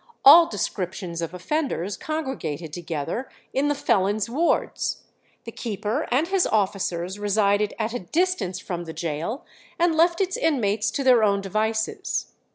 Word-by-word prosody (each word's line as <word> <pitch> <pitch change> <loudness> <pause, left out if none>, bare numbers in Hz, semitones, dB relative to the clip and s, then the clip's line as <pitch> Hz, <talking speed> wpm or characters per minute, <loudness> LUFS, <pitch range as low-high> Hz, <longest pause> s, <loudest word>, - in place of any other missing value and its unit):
All 330 +5 +10
descriptions 180 - -3
of 165 -1 -3
offenders 200 - -2
congregated 215 - -4
together 170 - -4 0.2
in 275 +2 +1
the 290 - +1
felons' 215 -4 +1
wards. 325 +7 0 0.4
The 230 - -7
keeper 220 +4 -3
and 280 +7 +2
his 380 -1 +2
officers 190 -2 -1
resided 205 0 +1
at 220 0 -2
a 245 - -2
distance 325 - -1
from 175 -2 -5
the 160 - -7
gaol, 170 - -3 0.3
and 340 0 +3
left 335 +2 +3
its 375 -1 0
inmates 225 -8 +1
to 275 - -2
their 250 -4 +5
own 200 -1 +3
devices. 220 +3 -2
215 Hz, 145 wpm, -24 LUFS, 185-285 Hz, 0.4 s, All